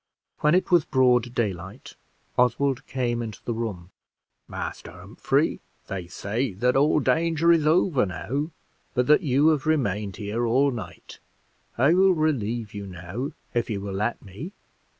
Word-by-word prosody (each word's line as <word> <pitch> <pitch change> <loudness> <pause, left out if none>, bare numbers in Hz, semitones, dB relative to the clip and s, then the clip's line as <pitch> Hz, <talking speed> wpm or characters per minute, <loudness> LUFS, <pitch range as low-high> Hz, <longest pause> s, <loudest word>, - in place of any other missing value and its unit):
When 150 +3 +3
it 185 - +1
was 175 -3 +5
broad 125 -3 +2
daylight, 95 -4 -4 0.4
Oswald 130 +1 +1
came 120 -2 -1
into 110 -4 -6
the 120 - -1
room: 100 -6 -5 0.6
"Master - - -6
Humphrey, - - -1 0.2
they 95 -3 -5
say 110 +6 -3
that 125 +7 +1
all 145 +3 +4
danger 165 +3 +2
is 160 -3 +3
over 155 - +3
now, 135 - -3 0.5
but 125 -1 +2
that 150 +6 +5
you 145 0 +3
have 155 -2 0
remained 105 -10 0
here 110 +3 -3
all 135 +4 +3
night. 105 -7 -9 0.6
I 140 +7 +4
will 190 +1 +5
relieve 120 -8 -1
you 100 -1 -6
now 95 +8 -6 0.2
if 120 -1 0
you 105 -3 -2
will 100 0 -5
let 105 +5 -1
me. 110 - -8
125 Hz, 150 wpm, -25 LUFS, 105-150 Hz, 0.6 s, was